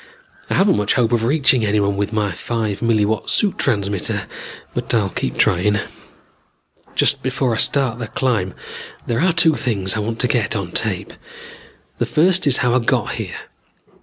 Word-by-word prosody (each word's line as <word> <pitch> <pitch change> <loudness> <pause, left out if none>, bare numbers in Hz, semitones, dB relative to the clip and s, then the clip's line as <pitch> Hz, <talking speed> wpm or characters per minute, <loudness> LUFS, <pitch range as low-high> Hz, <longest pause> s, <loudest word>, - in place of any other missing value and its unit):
I - - 0
haven't 195 - +3
much 105 0 +1
hope 120 -3 +2
of 120 -2 +1
reaching 130 -2 +3
anyone 100 -1 +1
with 100 +1 -2
my 105 -2 0
five 110 +2 -3
milliwatt 110 -2 0
suit 205 -3 +1
transmitter 100 -6 -1 0.5
but 120 -1 -3
I'll 100 -4 +1
keep - - -3
trying. 105 +4 +2 1.2
"Just - - +3
before 130 -1 -1
I 110 - -2
start 130 -5 +1
the 115 - -4
climb 110 -6 -1 0.5
there 120 +5 -1
are 185 +1 +3
two 165 -1 +4
things 105 -10 -1
I - - -1
want 110 +2 -3
to 125 - +2
get 110 -4 0
on - - -3
tape. - - -2 0.9
The - - 0
first 175 +1 +2
is 130 - +4
how 120 - +2
I 130 - +4
got 115 - 0
here. - - -5
115 Hz, 170 wpm, -19 LUFS, 105-130 Hz, 1.2 s, two